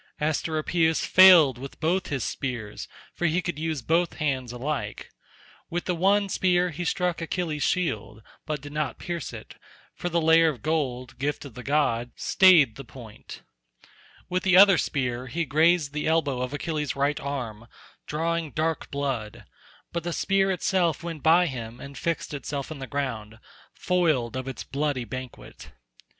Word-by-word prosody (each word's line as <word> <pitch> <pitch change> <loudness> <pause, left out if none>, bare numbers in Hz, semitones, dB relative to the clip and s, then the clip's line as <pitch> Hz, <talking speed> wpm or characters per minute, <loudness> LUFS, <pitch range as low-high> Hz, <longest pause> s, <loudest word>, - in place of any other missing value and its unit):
Asteropaeus 160 +2 0
failed 170 -9 +7
with 135 +1 -9
both 180 +3 0
his 135 -5 -2
spears, 120 -7 -4 0.3
for 175 - 0
he 160 +3 +1
could 175 -4 -4
use 160 -5 -3
both 170 +5 +1
hands 135 -5 -2
alike; 135 +5 -4 0.6
with 175 +1 -3
the 180 - 0
one 200 +4 +2
spear 180 -2 +1
he 165 +3 -5
struck 180 0 -1
Achilles' 165 -3 -3
shield, 110 - -1 0.2
but 150 -2 -3
did 145 0 -9
not 150 -5 -2
pierce 170 -4 -5
it, - - -10 0.4
for 175 - -4
the 170 0 +1
layer 165 0 +5
of 130 -8 -7
gold, 130 -6 -2
gift 145 +1 -2
of 135 - -10
the 125 - -8
god, 125 -5 0
stayed 160 - +5
the 135 - -7
point; 120 -4 -12 0.8
with 185 0 -1
the 185 -1 +4
other 195 -3 +8
spear 125 -2 -2
he 165 +6 -2
grazed 155 0 +2
the 150 0 -2
elbow 145 -6 +1
of 125 +1 -3
Achilles' 150 0 -3
right 140 +1 0
arm 120 -5 -5 0.4
drawing 165 +1 -1
dark 160 +3 -2
blood, 135 -7 -4 0.5
but 170 - -2
the 175 0 -3
spear 195 +1 +1
itself 180 -4 0
went 165 -3 -6
by 165 +4 +5
him 120 -6 -6
and 140 0 -10
fixed 165 +3 -3
itself 140 +1 -5
in 155 - -7
the 135 - -6
ground, 115 -5 -4 0.3
foiled 155 -10 0
of 130 0 -4
its 130 -4 -5
bloody 140 -3 -2
banquet. 130 - -9
150 Hz, 165 wpm, -26 LUFS, 130-170 Hz, 0.8 s, other